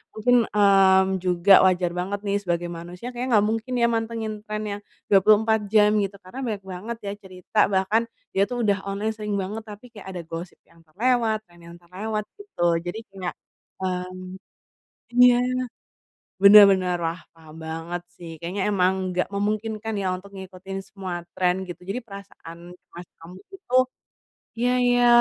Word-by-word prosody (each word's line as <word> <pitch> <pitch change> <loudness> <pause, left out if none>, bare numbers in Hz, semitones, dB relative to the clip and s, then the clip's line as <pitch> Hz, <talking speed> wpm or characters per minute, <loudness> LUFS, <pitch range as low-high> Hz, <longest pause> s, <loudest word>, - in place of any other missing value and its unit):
mungkin, 245 +3 +3 0.2
mmm, 190 -2 +4
juga 180 +2 +4
wajar 180 -2 +2
banget 200 +3 -3
nih 200 0 +1
sebagai 175 -1 -1
manusia 175 +6 -8
kayaknya 245 +1 -4
enggak 205 - +2
mungkin 225 +3 -3
ya 235 - +4
mantengin 225 -1 -2
trend 215 0 -3
yang 205 0 -5 0.3
24 215 +2 +4
jam 210 -1 +5
gitu. 200 0 -2
Karena 185 +8 -9
banyak 210 -5 -3
banget 190 +5 -6
ya - - -2
cerita, 185 +3 -4
bahkan 195 +4 +2 0.3
dia 195 - +2
tuh 245 -2 -3
udah 200 -2 +1
online 205 +3 -2
sering 210 -1 -3
banget 205 +3 -4
tapi 210 +4 -11
kayak 205 -4 -12
ada 175 - -4
gosip 165 +2 -8
yang 170 0 -24
terlewat, 220 +3 0
trend 175 0 -20
yang 170 - -11
terlewat 210 +5 -4 0.2
gitu. 405 - -2 0.2
Jadi 175 +5 -5
kayak 190 -2 -6 0.5
mmm, 185 0 -4 0.8
iya. 250 -1 +8 1.1
Bener 205 +1 +10
bener, 185 -2 0
wah 165 +1 -2
paham 160 -1 -15
banget 165 +2 -5
sih 170 -2 -10
kayaknya 190 +4 -2
memang 185 -1 +3 0.2
enggak 180 0 -1
memungkinkan 215 +2 -2
ya 190 - -2
untuk 195 +2 -13
ngikutin 190 0 -8
semua 185 -3 -6 0.2
trend 185 +1 +1
gitu. 175 - -8
Jadi 230 +6 -2
perasaan 200 -5 -11 0.2
cemas 175 -1 -13
kambuh 180 +3 -13
itu 255 -9 -2 0.8
iya 245 +1 +2
iya. 245 0 +4
195 Hz, 160 wpm, -24 LUFS, 180-215 Hz, 1.1 s, Bener